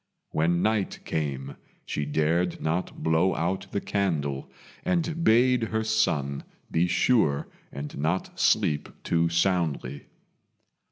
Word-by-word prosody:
When 85 Hz, +3 st, +1 dB
night 110 Hz, -2 st, +1 dB
came 70 Hz, -3 st, -3 dB, 0.3 s
she 75 Hz, -, -2 dB
dared 80 Hz, +4 st, +1 dB
not 85 Hz, +4 st, -2 dB
blow 80 Hz, +4 st, +3 dB
out 95 Hz, +4 st, -1 dB
the 100 Hz, -, 0 dB
candle, 75 Hz, -9 st, -1 dB, 0.3 s
and 170 Hz, -2 st, 0 dB
bade 125 Hz, +1 st, +5 dB
her 110 Hz, 0 st, -1 dB
son 75 Hz, -11 st, 0 dB, 0.3 s
be 85 Hz, +2 st, +2 dB
sure 90 Hz, -, +2 dB, 0.2 s
and 70 Hz, +2 st, -6 dB
not 80 Hz, +6 st, -1 dB
sleep 75 Hz, -1 st, +2 dB
too 85 Hz, 0 st, +2 dB
soundly. 85 Hz, -6 st, 0 dB
85 Hz, 115 wpm, -27 LUFS, 75-100 Hz, 0.3 s, bade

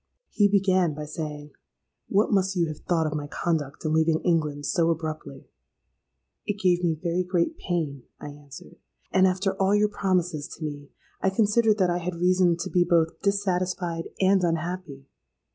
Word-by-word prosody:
"He 205 Hz, -2 st, +4 dB
began 185 Hz, -5 st, +2 dB
by 150 Hz, 0 st, -5 dB
saying 150 Hz, -1 st, -6 dB, 0.6 s
'What 205 Hz, +2 st, +2 dB
must 190 Hz, 0 st, +2 dB
you 175 Hz, -2 st, +2 dB
have 155 Hz, -, -7 dB
thought 165 Hz, -2 st, 0 dB
of 155 Hz, -, -2 dB
my 145 Hz, -1 st, -4 dB
conduct 150 Hz, -2 st, -3 dB
in 155 Hz, -, 0 dB
leaving 160 Hz, 0 st, +3 dB
England 150 Hz, -4 st, 0 dB
so 170 Hz, -1 st, +2 dB
abruptly?'—'It 155 Hz, -, -8 dB
gave 180 Hz, -2 st, +2 dB
me 165 Hz, -2 st, +2 dB
very 170 Hz, +3 st, -1 dB
great 180 Hz, -2 st, 0 dB
pain,' 155 Hz, -7 st, -2 dB, 0.2 s
I -, -, -7 dB
answered; 145 Hz, +3 st, -13 dB, 0.3 s
'and, 190 Hz, 0 st, +5 dB
after 190 Hz, +1 st, 0 dB
all 195 Hz, +2 st, +3 dB
your 210 Hz, 0 st, +3 dB
promises 180 Hz, -7 st, -1 dB
to 160 Hz, -, -8 dB
me, 145 Hz, -2 st, -6 dB, 0.3 s
I 190 Hz, -, +3 dB
considered 215 Hz, +2 st, +3 dB
that 185 Hz, -3 st, +2 dB
I 175 Hz, -, 0 dB
had 180 Hz, 0 st, -4 dB
reason 180 Hz, 0 st, +3 dB
to 185 Hz, -, -4 dB
be 180 Hz, -2 st, +4 dB
both 165 Hz, -2 st, +1 dB
dissatisfied 180 Hz, -4 st, -1 dB
and 190 Hz, 0 st, +3 dB
unhappy.' 170 Hz, -4 st, -3 dB
175 Hz, 165 wpm, -26 LUFS, 155-185 Hz, 0.6 s, and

